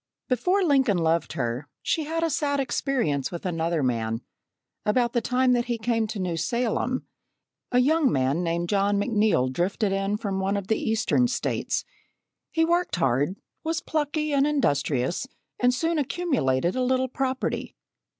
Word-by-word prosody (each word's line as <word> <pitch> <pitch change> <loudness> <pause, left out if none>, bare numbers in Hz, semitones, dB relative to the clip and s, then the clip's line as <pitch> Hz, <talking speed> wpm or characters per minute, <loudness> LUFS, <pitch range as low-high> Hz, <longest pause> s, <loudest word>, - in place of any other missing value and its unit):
Before 360 - +2
Lincoln 270 - +3
loved 165 0 +1
her, 125 +3 -2 0.2
she 315 - 0
had 330 +2 -2
a 330 - +2
sad 285 0 0
experience 245 - 0
with 175 0 -6
another 165 -3 0
man. 115 -2 -1 0.6
About 235 +2 +1
the 240 - +2
time 250 +2 +2
that 240 -1 +1
he 240 -1 -1
came 225 0 0
to 215 0 -5
New 180 -3 -2
Salem, 240 +7 -1 0.7
a 250 - +3
young 285 +1 +4
man 135 +5 +1
named 170 0 -1
John 200 +1 +2
McNeil 205 - +2
drifted 195 - 0
in 195 +1 0
from 200 -3 -2
one 195 +1 0
of 200 -1 -5
the 220 - +2
Eastern 225 +2 +2
States. 245 - -1 0.6
He 325 -1 +2
worked 345 +2 +1
hard, 145 +2 +1 0.3
was 325 +1 -1
plucky 305 0 -1
and 280 +1 +3
industrious, 155 - 0 0.3
and 245 0 +4
soon 325 +5 0
accumulated 250 - 0
a 255 - 0
little 260 +1 +2
property. 260 0 -2
225 Hz, 160 wpm, -26 LUFS, 170-270 Hz, 0.7 s, young